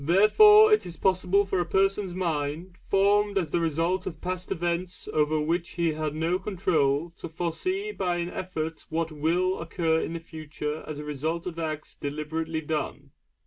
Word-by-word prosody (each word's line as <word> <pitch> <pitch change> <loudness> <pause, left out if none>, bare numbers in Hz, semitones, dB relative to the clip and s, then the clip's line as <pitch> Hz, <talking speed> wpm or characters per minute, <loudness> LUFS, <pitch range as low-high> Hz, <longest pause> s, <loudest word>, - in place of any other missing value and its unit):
Therefore 420 - +7
it 425 - +4
is 170 -1 -8
possible 190 +1 +2
for 190 -1 -1
a - - +2
person's 195 0 +1
mind, 165 0 -3
formed 200 +1 +3
as 170 -6 -1
the - - +1
result 165 +3 0
of 160 -4 -6
past 180 +1 -4
events 175 +1 -2
over 155 0 +2
which 165 +3 -1
he 170 -1 +1
had 155 -1 -3
no 165 +3 0
control, 165 -6 0
to - - -7
foresee 370 - -2
by 180 - -1
an 175 0 -3
effort 160 -3 -5
what 165 0 -1
will 170 +5 0
occur 165 -1 0
in - - -4
the 170 - -4
future 155 -2 -6
as 155 - -5
the 150 - -6
result 155 +3 -3
of 170 -2 -5
acts 155 -2 -4
deliberately 160 +2 -3
done. 150 -1 -4
170 Hz, 175 wpm, -27 LUFS, 155-185 Hz, -, Therefore